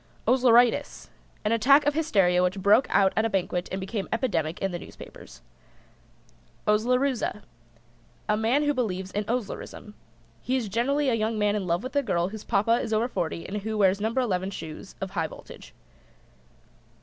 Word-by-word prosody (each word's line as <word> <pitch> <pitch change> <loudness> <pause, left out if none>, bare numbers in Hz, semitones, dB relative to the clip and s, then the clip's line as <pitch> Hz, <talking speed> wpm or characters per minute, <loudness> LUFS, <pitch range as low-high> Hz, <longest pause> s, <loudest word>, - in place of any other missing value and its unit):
OSLERITIS. 245 -2 +3 0.3
An 210 - +1
attack 270 +6 +5
of 290 - +2
hysteria 195 - +2
which 180 +2 0
broke 205 +6 +4
out 195 -1 +3
at 220 - +2
a 225 - +1
banquet 180 -2 -2
and 190 - -3
became 195 +1 -4
epidemic 175 - -1
in 195 - -1
the 175 - -4
newspapers. - - -13 1.2
OSLEROOZA. 240 +1 +1 0.8
A 210 - +2
man 230 +7 +1
who 290 0 +2
believes 190 -7 -3
in 205 +1 -2
Oslerism. 225 -2 -5 0.5
He 255 - -1
is 230 -5 -3
generally 270 +7 +1
a - - +1
young 220 0 -1
man 210 0 +1
in 195 -3 -3
love 170 +4 0
with 255 +3 -7
a 285 - +4
girl 180 -8 0
whose 215 0 -8
Papa 230 +4 +2
is 225 - -5
over 220 +2 +1
forty 165 -8 -3
and 205 - -4
who 215 +1 -3
wears 195 -1 +3
No. 215 - +1
11 195 -7 -1
shoes 165 0 -9
of 195 -1 -5
a - - -17
high 165 -4 -1
voltage. - - -13
210 Hz, 175 wpm, -26 LUFS, 190-245 Hz, 1.2 s, attack